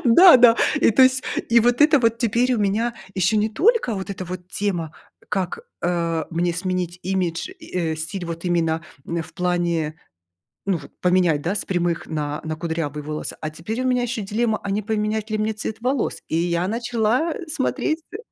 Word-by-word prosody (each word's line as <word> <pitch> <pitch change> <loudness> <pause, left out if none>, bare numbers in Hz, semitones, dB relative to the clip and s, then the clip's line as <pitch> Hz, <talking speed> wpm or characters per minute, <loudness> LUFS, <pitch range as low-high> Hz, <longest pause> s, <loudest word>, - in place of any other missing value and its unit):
Да-да. 245 -3 +8 0.2
И, - - +5
то 245 +5 +5
есть, 260 0 +4 0.3
и 235 0 +6
вот 245 +1 +2
это 300 -2 +6
вот 230 -1 +2
теперь 240 +2 +2
у - - -1
меня 215 +4 0 0.2
ещё 190 +3 +2
не 210 +1 +2
только 370 - +2
вот 190 0 -5
эта 190 -1 -5
вот 180 0 -7
тема, 175 -6 -2 0.4
как, 190 -4 -2 0.2
э, 170 -2 0
мне 175 +1 0
сменить 180 -1 -2
имидж 185 - -1
и, 180 - -2
э, - - -4
стиль 170 +4 -5
вот 165 0 -6
именно 165 -2 0 0.2
н 170 0 -2
в - - -14
плане, 175 -4 0 0.7
ну 195 -3 +1
вот, 145 - -12
поменять, 180 -4 +3
да, 175 - 0
с - - -2
прямых 175 -2 -1
на 150 -1 -3
на 155 0 -3
кудрявые 160 -3 -3
волосы, 150 +1 -5
а 155 - -2
теперь 210 +10 -4
у - - +1
меня 250 -1 +2
ещё 240 -2 -2
дилемма, 215 +2 0
а 200 - -3
не 205 +2 0
поменять 215 0 -1
ли 215 - +1
мне 215 +1 0
цвет 215 0 -5
волос, 255 +1 -1
и - - -1
я 170 +1 0
начала, 240 - 0
э, 360 - -7
смотреть, 310 +1 -1
э - - -4
195 Hz, 195 wpm, -22 LUFS, 170-230 Hz, 0.7 s, Да-да